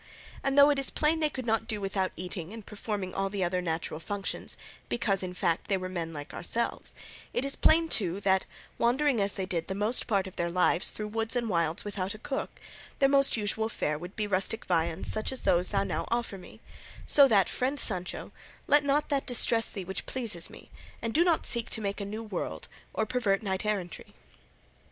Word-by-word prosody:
And 275 0 0
though 285 +1 +8
it 285 - 0
is 275 - +3
plain 310 +2 +1
they 305 -1 +2
could 260 -4 -6
not 225 -1 0
do 215 -4 -2
without 195 -1 -1
eating 180 0 -5
and 225 -2 -9
performing 205 -3 -4
all 195 0 -1
the 195 -1 -2
other 180 +1 0
natural 160 -2 -3
functions, 200 +3 -2 0.3
because, 200 -5 +1
in 180 -1 -5
fact, 170 -2 0
they 195 - +1
were 185 0 -4
men 170 -3 -4
like 145 -2 -8
ourselves, 230 +7 -3 0.4
it 255 - 0
is 275 - +2
plain 325 +1 +4
too 190 - +1
that, 190 -1 +2 0.3
wandering 255 0 +2
as 200 0 +1
they 190 - -2
did 175 -4 -2
the 190 - -3
most 210 +5 +1
part 200 -4 +1
of 190 - -10
their 170 0 0
lives 180 0 +2
through 210 0 -5
woods 225 +2 0
and 235 -2 0
wilds 170 -3 +1
and - - -21
without 200 0 -3
a - - -9
cook, 265 +5 -5 0.4
their 275 - +4
most 275 -3 +4
usual 220 +1 -1
fare 150 -8 -2
would 175 +3 -9
be 215 - -1
rustic 205 +3 0
viands 170 -1 0
such 215 +3 -2
as 260 - -4
those 180 +1 +2
thou 195 -1 +1
now - - -2
offer 235 -3 -1
me; 185 - -13 0.4
so 280 -2 +7
that, 200 -6 +4
friend 270 +3 -1
Sancho, 180 -4 +2 0.3
let 290 0 +5
not 285 +1 +1
that 280 -2 0
distress 230 -2 +4
thee 195 -4 -5
which 190 +2 -5
pleases 225 -10 +1
me, - - -14 0.3
and 230 -1 -3
do 330 - +5
not 345 -3 +2
seek 235 -2 +1
to - - -2
make 200 -1 -3
a - - -3
new 215 +3 -5
world 210 -5 -5 0.2
or 220 - -1
pervert 215 -4 0
knight 190 0 -2
errantry." 190 -5 -4
205 Hz, 215 wpm, -29 LUFS, 185-235 Hz, 0.4 s, though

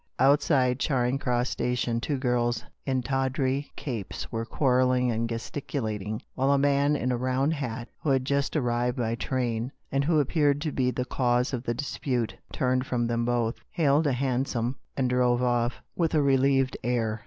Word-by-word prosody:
Outside 135 -1 +3
Charing 130 -2 +1
Cross 125 -2 0
station 125 -1 -1
two 145 +2 -1
girls 120 -3 0 0.2
in 130 -2 0
tawdry 135 +1 0
capes 115 -9 -5
were 115 0 -2
quarrelling 125 -1 +2
and 115 0 -1
gesticulat 115 -2 -3
ing, 105 +2 -5
while 135 +1 +1
a 140 - +4
man 140 +1 +3
in 130 -3 -1
a 125 - 0
round 130 +4 +1
hat, 125 -5 -4
who 155 - -1
had 130 -1 +2
just 140 +2 0
arrived 120 -3 0
by 115 -2 0
train, 120 0 -2 0.2
and 140 +1 +1
who 155 +1 +3
appeared 145 0 +2
to 155 -1 -1
be 130 -2 +1
the 125 0 -2
cause 125 0 +1
of 125 -1 -3
the 120 - -1
dispute, 125 -3 -2 0.2
turned 130 0 0
from 120 -2 0
them 115 0 0
both, 120 -1 0
hailed 150 -1 +2
a 140 - +2
hansom, 125 -1 -1 0.2
and 130 -2 +2
drove 125 0 +2
off 120 -1 0
with 165 -2 +1
a 150 - +4
relieved 135 -1 +3
air. 115 -2 0
125 Hz, 175 wpm, -27 LUFS, 120-140 Hz, 0.2 s, a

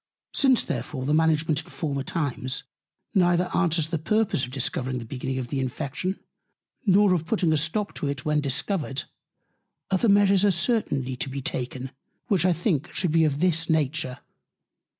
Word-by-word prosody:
Since 265 -3 +4
therefore 130 -4 -4
the 145 - +1
Management 155 -1 +2
in - - -18
former 140 -4 -3
Times 135 -3 -3 0.5
neither 180 -1 +2
answers 165 -4 +2
the 165 -2 -1
Purpose 215 - +1
of 125 - -3
discovering 130 -1 -1
the 120 - -6
Beginning 130 +2 -4
of 125 -2 -4
the 135 - -2
Infection, 140 +8 -3 0.7
nor 200 0 +5
of 165 -2 -1
putting 175 -5 +2
a - - +3
stop 165 +7 -1
to 145 - -2
it 140 -1 -4
when 150 -1 +2
Discovered, 140 +1 -1 0.9
other 195 +4 +3
Measures 200 -1 +5
are 205 - +5
certainly 170 - 0
to 135 - -3
be 135 0 -5
taken; 130 0 -4 0.4
which 190 -4 +3
I 185 - +4
think 170 -3 0
should 180 -4 0
be 165 0 +4
of 145 0 -1
this 165 -2 +2
Nature. 155 -4 0
155 Hz, 170 wpm, -25 LUFS, 135-180 Hz, 0.9 s, nor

